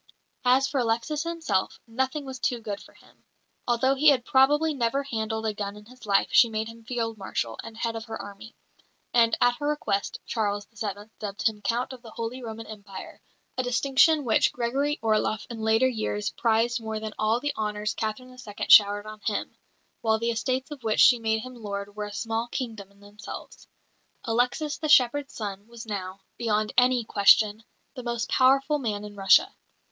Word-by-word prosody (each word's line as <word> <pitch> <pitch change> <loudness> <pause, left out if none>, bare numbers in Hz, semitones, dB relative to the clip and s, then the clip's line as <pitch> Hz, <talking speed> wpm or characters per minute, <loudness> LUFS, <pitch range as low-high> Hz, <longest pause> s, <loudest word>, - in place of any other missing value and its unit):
As 260 +2 +4
for 275 - -1
Alexis 235 +6 0
himself, 320 - -1
nothing 265 +5 -2
was 260 -1 -7
too 245 -1 0
good 205 -3 -5
for - - -16
him. - - -23 0.4
Although 245 +3 +3
he 280 +3 +2
had 260 -4 +5
probably 295 +4 +4
never 270 +1 0
handled 220 -4 -3
a 215 - 0
gun 205 0 -5
in 210 - -14
his 250 -1 -15
life 195 -1 +3
she 235 - +6
made 220 0 -2
him 230 0 -11
Field 225 -2 -3
Marshal 115 - -3
and 225 - -10
head 230 0 -2
of 225 0 -5
her 225 -1 -6
army; 205 +3 -10 0.6
and, 230 -2 +4
at 245 0 +3
her 290 - -3
request, 295 -9 -1
Charles 205 -2 -1
VII. 205 0 -6
dubbed 205 +2 -1
him 215 -2 -3
Count 240 +6 -1
of 255 - -11
the 235 - -12
Holy 230 +3 -5
Roman 225 -1 -7
Empire, 200 -3 -10 0.4
a - - +4
distinction 275 +5 +3
which 220 - +3
Gregory 270 +5 -1
Orloff 215 0 +1
in 230 - -6
later 220 +3 +3
years 215 -4 -2
prized 230 +1 +1
more 220 -1 -4
than 215 0 -6
all 220 +2 +2
the 290 +2 -2
honours 210 0 -2
Catherine 225 +3 -4
II. 245 -5 -7
showered 205 0 +7
on 215 0 -9
him; 210 - -2 0.5
while 220 -2 +2
the 230 +1 -1
estates 255 +5 -2
of 290 -3 -8
which 220 -1 0
she 245 -2 +7
made 220 -1 0
him 255 0 -8
lord 205 -3 -6
were 210 0 -3
a 205 - -8
small 225 +2 -2
kingdom 225 -6 -5
in 200 0 -24
themselves. 205 +1 -10 0.6
Alexis, 250 +6 0
the 310 - -2
shepherd's 275 0 +4
son, 205 -1 -6
was 235 -1 -10
now, 195 -3 -5 0.2
beyond 215 -2 0
any 250 -1 +4
question, 210 +1 +4 0.3
the 255 - -7
most 235 -3 -3
powerful 275 +3 +3
man 210 -5 -3
in 205 0 -10
Russia. 195 -1 +5
225 Hz, 190 wpm, -26 LUFS, 210-255 Hz, 0.6 s, showered